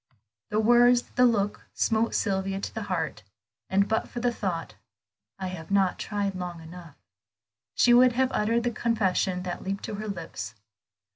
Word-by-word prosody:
The 210 - 0
words, 240 +2 +5
the 250 - +4
look, 205 -3 -1
smote 225 0 +1
Sylvia 195 -1 0
to - - -5
the 220 - -4
heart, 165 -11 -2 0.5
and 200 +1 +3
but 220 - 0
for 240 - -6
the 240 0 +1
thought, 180 -7 -3 0.6
"I 190 - -5
have 165 -3 -8
not 195 -2 +2
tried 205 -2 -2
long 180 -2 -5
enough," 165 -1 -11 0.8
she 240 - +5
would 250 0 +6
have 260 +1 +1
uttered 230 +1 +1
the 240 - 0
confession 195 -5 0
that 180 -1 -4
leaped 195 +1 -4
to - - -5
her 215 - -5
lips. 170 - -6
200 Hz, 165 wpm, -27 LUFS, 185-230 Hz, 0.8 s, would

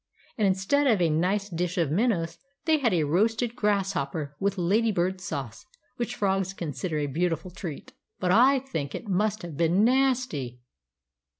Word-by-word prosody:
And 210 -3 +2
instead 195 +10 +2
of 220 -6 +4
a 170 -3 +2
nice 190 +6 +1
dish 180 0 -3
of 165 -5 +1
minnows 170 -4 0 0.3
they 315 -2 +3
had 240 -5 +2
a 170 -4 +2
roasted 225 - +1
grasshopper 175 -8 -1
with 195 0 0
lady 210 +6 +2
bird 185 0 -1
sauce; 140 - -6 0.3
which 240 - -3
frogs 195 -1 0
consider 165 -1 -4
a 150 - 0
beautiful 165 +4 -1
treat; 175 - -7 0.3
but 180 -1 +1
I 255 +7 +6
think 200 - -4
it - - -7
must 205 +2 0
have 170 -4 -7
been 170 +6 +3
nasty! 250 - +1
190 Hz, 165 wpm, -27 LUFS, 165-220 Hz, 0.3 s, I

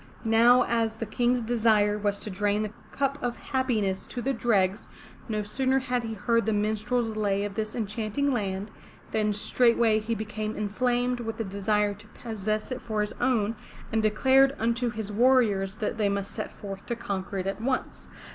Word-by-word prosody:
'* - - -21
Now 235 +2 +6
as 225 -1 0
the 230 - -4
King's 240 +2 +1
desire 220 -3 +3
was 205 -1 0
to 210 - -5
drain 205 +2 0
the 215 -1 -5 0.2
cup 275 0 -1
of 240 -1 -2
happiness 225 -8 -1
to 250 - -6
the 270 +3 0
dregs, 205 -5 +1 0.4
no 215 -1 -1
sooner 260 +5 +1
had 250 -2 0
he 225 -1 -5
heard 230 +2 +1
the 220 - +2
minstrel's 220 +2 0
lay 200 -2 0
of 205 - -5
this 215 +1 -3
enchanting 225 +5 -1
land 200 -2 -2 0.4
than 215 -1 +1
straightway 230 +1 +3
he 225 +2 -2
became 215 0 -4
inflamed 245 +4 0
with 225 -1 -4
the 225 - -1
desire 205 +1 0
to 210 +2 -15
possess 215 0 -4
it 255 -1 -4
for 215 -3 -2
his 210 - -2
own, 230 -4 +2 0.4
and 220 - +2
declared 265 +6 +4
unto 235 +2 0
his 220 -3 -5
warriors 210 -4 +3
that 220 0 -3
they 205 -2 +3
must 200 0 -2
set 215 - -5
forth 195 -1 -8
to 235 - -1
conquer 195 -3 -4
it 185 - -2
at 195 +2 -3
once. 260 +2 -2
220 Hz, 185 wpm, -27 LUFS, 205-240 Hz, 0.4 s, Now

